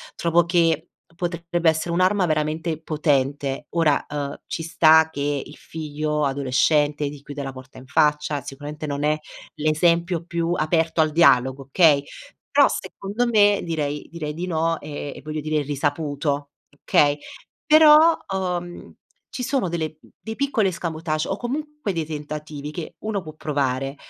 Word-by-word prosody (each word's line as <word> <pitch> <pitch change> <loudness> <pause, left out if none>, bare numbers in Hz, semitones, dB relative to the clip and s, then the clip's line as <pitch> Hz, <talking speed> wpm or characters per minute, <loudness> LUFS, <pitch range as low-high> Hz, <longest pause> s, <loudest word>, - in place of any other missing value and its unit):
trovo 170 0 +2
che 165 -2 +1 0.3
potrebbe 170 -1 0
essere 160 +1 -1
un'arma 185 +1 +2
veramente 155 +1 -1
potente. 145 -2 0
Ora, 160 -4 +2
uhm, 145 -1 -4
ci 165 - -4
sta 160 -1 +5
che 145 -2 -2
il - - -13
figlio 150 -1 -3
adolescente 145 +2 +1
ti 145 -1 -11
chiude 145 0 -7
la 135 - -4
porta 130 0 -12
in 130 - -14
faccia, 150 0 +1
sicuramente 145 +3 -7
non 145 0 -3
è 155 0 +2 0.4
l'esempio 170 +2 +1
più 170 -1 -2
aperto 160 0 +1
al 155 -1 +2
dialogo, 135 -5 +4
okay, 145 0 +4 0.5
però - - +7
secondo 205 +5 -3
me 205 -3 +4
direi 150 -4 -3
direi 155 -3 -5
di 175 +2 -3
no 165 -1 0
e 145 -1 -6
e - - -10
voglio 155 0 -4
dire 155 0 0
è - - -4
risaputo, 145 0 -2 0.3
okay? 145 0 +3 0.5
Però, 310 +1 +7 0.2
uhm, 175 -2 -4 0.4
ci 255 - -5
sono 255 -5 0
delle 160 -2 -3 0.2
dei 220 0 -6
piccoli 260 -7 +1
escamotage 165 -3 -2
o 195 - -1
comunque 290 -2 -4
dei 165 -2 -2
tentativi 150 -1 -6
che 160 +1 -7
uno 210 -4 -3
può 155 -1 -9
provare. 135 -3 -2
155 Hz, 150 wpm, -23 LUFS, 145-175 Hz, 0.5 s, però